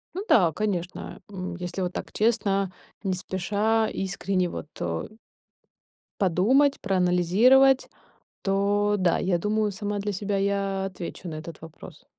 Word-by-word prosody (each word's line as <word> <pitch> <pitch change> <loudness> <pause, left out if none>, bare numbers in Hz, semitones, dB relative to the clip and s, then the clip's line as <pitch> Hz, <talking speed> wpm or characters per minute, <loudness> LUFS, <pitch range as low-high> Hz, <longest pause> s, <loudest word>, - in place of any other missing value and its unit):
Ну 385 - -3
да, 175 -7 +5
конечно. 180 -1 -4
Эм, 185 -2 -5
если 180 +1 -5
вот 180 0 -2
так - - -6
честно, 200 -4 +1 0.3
не 190 - 0
спеша, 205 +5 0
искренне 190 -1 -1
вот 155 - -6
о 80 -1 -2 1.1
подумать, 235 - +3
проанализировать. 200 +9 +4 0.5
То 205 +1 +1
да, 180 -2 +3
я 180 -2 +1
думаю, 210 +3 0
сама 205 +1 -3
для 205 +1 -2
себя 200 +1 -2
я 195 -1 0
отвечу 180 -1 -7
на 155 - -6
этот 160 +1 -8
вопрос. 160 0 -12
195 Hz, 135 wpm, -26 LUFS, 180-210 Hz, 1.1 s, да